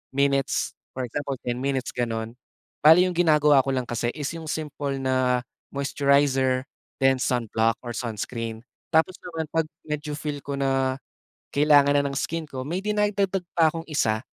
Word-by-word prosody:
minutes. 140 -1 +1 0.2
For 130 - -2
example, 140 +3 -3
10 120 0 -2
minutes 135 -1 -1
gano'n. 115 -2 -2 0.5
Bale 160 +4 +8
yung 180 -1 -1
ginagawa 150 -4 +5
ko - - -1
lang 130 -1 0
kasi 120 0 -1
is 145 -1 -3
yung 160 -1 -8
simple 145 -3 -3
na 130 -1 +1 0.3
moisturizer, 140 -2 +2 0.4
then 135 0 +4
sunblock 115 -3 +1
or 120 - -5
sunscreen. 115 0 -4 0.3
Tapos, 160 +3 +3
naman 165 -2 -5
'pag 160 -1 +1 0.2
medyo 150 0 -4
feel 145 -1 -4
ko 140 0 -5
na, 135 -1 +1 0.6
kailangan 145 -1 +5
na 140 - +3
ng 140 - -4
skin 165 +3 -2
ko 130 -2 -5
may 170 +6 -2
dinadagdag 200 -2 0
pa 160 -2 +5
kong 165 -1 -4
isa, 110 -8 +1
140 Hz, 160 wpm, -25 LUFS, 130-155 Hz, 0.6 s, Bale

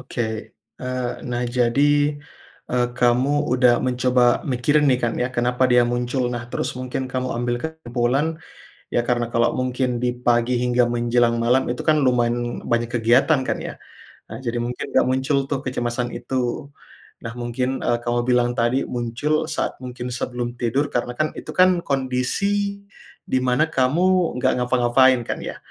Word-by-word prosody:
oke, 125 -1 -4 0.6
eee, 125 -1 -2 0.2
nah 120 0 -1
jadi, 140 +5 +2 0.6
eee, 125 -1 +2
kamu 130 +4 +2
udah 125 -1 +4
mencoba 125 -1 +2
mikirin 145 +4 +2
nih 125 - +4
kan 115 - 0
ya, 125 - +1
kenapa 125 +2 +2
dia 125 -1 +5
muncul? 120 +1 -1
Nah 120 0 -5
terus - - -3
mungkin 130 +1 -3
kamu 130 0 -1
ambil 120 0 -1
kesimpulan, 150 +1 -1 0.5
ya 120 - 0
karena 120 -1 0
kalau 115 0 +3
mungkin 125 -1 -1
di 125 0 -1
pagi 120 0 +1
hingga 125 0 +2
menjelang 120 0 +1
malam 125 +3 +2
itu 120 - -3
kan 155 -1 +3
lumayan 120 -1 0
banyak 120 0 +2
kegiatan 120 +4 +3
kan - - -2
ya. - - -6 0.5
Ah 110 - -7
jadi 120 0 -2
mungkin 120 +1 -4
nggak - - +3
muncul 130 +2 +1
tuh - - -1
kecemasan 120 -1 -2
itu. 130 +1 -3 0.6
Nah 115 - -4
mungkin, 125 +2 -2
eee, 120 - +1
kamu 120 0 0
bilang 125 -1 +3
tadi 120 +3 +1
muncul 125 +6 -1
saat 155 - -3
mungkin 125 -1 -6
sebelum 120 0 -3
tidur 135 +5 0
karena 120 0 -2
kan 155 0 0
itu - - -10
kan 185 -1 +5
kondisi 195 +10 -1 0.4
di 130 - 0
mana 125 +4 +2
kamu 170 +5 +2
nggak 125 - +2
ngapa-ngapain 125 +1 +4
kan - - -3
ya. - - -6
125 Hz, 160 wpm, -22 LUFS, 120-130 Hz, 0.6 s, dia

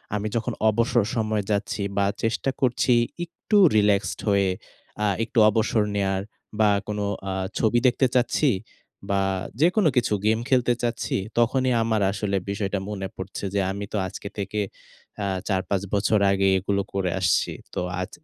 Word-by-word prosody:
আমি 105 +1 -2
যখন 115 -1 -1 0.2
অবসর 115 +1 +2
সময়ে 110 -2 0
যাচ্ছি 100 0 -1 0.2
বা 100 - +3 0.2
চেষ্টা 115 +4 0
করছি, 125 -1 +2 0.3
একটু 180 +5 -1 0.2
রিল্যাক্সড 105 -1 +2
হয়ে 100 -1 +3 0.5
আ - - +2 0.2
একটু 115 +1 0
অবসর 110 0 +1
নেওয়ার 95 -1 0 0.4
বা 110 -1 +5 0.2
কোনো 105 -1 -2 0.2
আ - - -1 0.3
ছবি 115 +1 +3
দেখতে 130 +2 +3
চাচ্ছি 130 +4 +3 0.6
বা 100 0 +2 0.4
যেকোনো 180 +2 +4
কিছু 120 -3 +2
গেম 110 +1 +3
খেলতে 125 -2 +3
চাচ্ছি, 120 -1 -2 0.2
তখনই 130 +2 +2
আমার 110 -2 0
আসলে 100 0 -1
বিষয়টা 100 0 -2
মনে 95 -2 -4
পড়ছে 95 +1 -6
যে, 100 - +1
আমি 100 +1 -4
তো - - 0
আজকে 100 +2 -8
থেকে 100 +2 -2 0.6
আ - - 0 0.2
৪ 95 -3 +1
৫ 100 -2 +1
বছর 105 +1 +2
আগে 95 0 +2
এগুলো 100 +1 0
করে 95 -2 0
আসছি। 90 - +2 0.2
তো - - -2 0.2
আজ 90 - -4
105 Hz, 160 wpm, -24 LUFS, 100-115 Hz, 0.6 s, বা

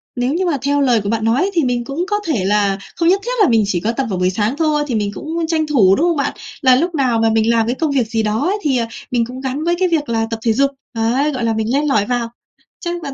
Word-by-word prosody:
nếu 250 +2 0
như 365 +3 0
mà 330 -5 0
theo 285 +1 +1
lời 245 -5 +3
của 200 - -3
bạn 225 0 -1
nói, 255 - +2
thì 335 -4 +2
mình 245 -2 0
cũng 280 +8 -3
có 415 0 0
thể 235 - 0
là 200 -1 +2 0.2
không 335 0 +2
nhất 390 +2 +3
thiết - - -2
là - - +4
mình 225 -2 +3
chỉ 185 -3 0
có 215 +6 -1
tập 260 +3 -2
vào 185 -3 -2
buổi 180 0 +2
sáng 210 +6 -1
thôi, 305 -2 +1
thì 250 - -2
mình 205 -2 -1
cũng 325 +7 -4
tranh 315 -1 0
thủ, 205 -11 +4
đúng 325 - +1
không 340 -3 +1
bạn? 280 - -1 0.3
Là 260 -3 +5
lúc 335 +6 0
nào 255 -5 +1
mà 225 0 +3
mình 220 0 +2
làm 230 -1 +3
cái 240 +3 -1
công 315 +1 -1
việc 260 -5 +1
gì 225 0 -1
đó 215 +1 0
ấy, 400 +3 0
thì, 280 -7 +1
à, 230 -1 -1 0.2
mình 240 -2 +1
cũng 250 +2 -8
gắn 265 +3 -3
với 345 +1 +1
cái 375 - +3
việc 315 -5 -1
là 225 -1 0
tập 225 - -3
thể 225 - +2
dục. 275 +4 +2 0.2
Đấy, 245 +6 +1
gọi 255 -4 -3
là 225 -1 +1
mình 220 +2 -1
len 290 +2 +1
lỏi 215 -8 +2
vào. 240 0 -2 0.5
Chắc 345 -1 -3
bạn 280 -3 -5
250 Hz, 305 wpm, -18 LUFS, 225-300 Hz, 0.5 s, Là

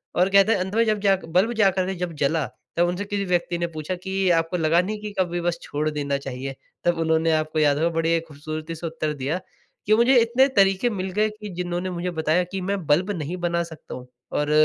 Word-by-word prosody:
और 180 +2 +3
कहते 200 +2 +5
हैं 205 - +2
अंत 190 +3 -3
में 230 - +4
जब 215 -1 +1
जा 195 -1 +4
बल्ब 190 +8 +2
जाकर 190 -2 +3
के 190 - -2
जब 175 -1 -4
जला 155 0 +1 0.3
तब 175 0 +4
उनसे 180 +4 -2
किसी 200 -1 -2
व्यक्ति 175 -1 0
ने 170 0 -1
पूछा 155 +2 -4
कि 190 -1 0
आपको 165 +2 -2
लगा 165 +2 +3
नहीं 210 +3 -4
कि 210 - -5
कभी 175 -1 0
बस 170 0 -1
छोड़ 150 +1 -2
देना 145 -2 -1
चाहिए? 135 0 -6 0.3
तब 175 -1 +2
उन्होंने 160 0 +2
आपको 155 0 0
याद 145 -1 +3
होगा 165 +2 +2
बड़ी 165 0 +2
खूबसूरती 155 +2 -6
से 165 +1 -5
उत्तर 155 -1 -2
दिया 145 +5 -2 0.5
कि 215 +1 +5
"मुझे 240 +3 +4
इतने 245 +4 +4
तरीक़े 195 +4 +4
मिल 190 -4 -3
गए 215 +3 +2
कि 210 -1 -9
जिन्होंने 180 +1 -2
मुझे 180 0 -3
बताया 160 +2 +1
कि 195 - -3
मैं 190 -2 -2
बल्ब 175 +7 +3
नहीं 175 -1 -4
बना 170 -1 0
सकता 165 -2 -9
हूँ।" 125 0 -10 0.2
और 150 0 0
175 Hz, 230 wpm, -24 LUFS, 155-195 Hz, 0.5 s, कहते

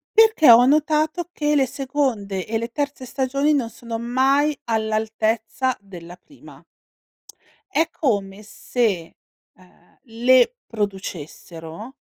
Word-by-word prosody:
Perché 440 - +6
ho 235 +2 +8
notato 310 +4 +1
che 300 -3 0
le 275 -2 +3
seconde 245 -9 -2
e 225 - -1
le 230 +1 -5
terze 285 -1 -4
stagioni 275 +3 0
non 260 -6 0
sono 230 0 -7
mai 270 +5 +1
all'altezza 220 +3 -1
della 180 -3 -12
prima. 285 +7 -17 1.1
È 320 -2 +2
come 200 -7 -2
se, 210 -5 -2 0.4
ehm, 185 -1 -25
le 250 - +3
producessero 190 - -7
235 Hz, 110 wpm, -22 LUFS, 210-280 Hz, 1.1 s, ho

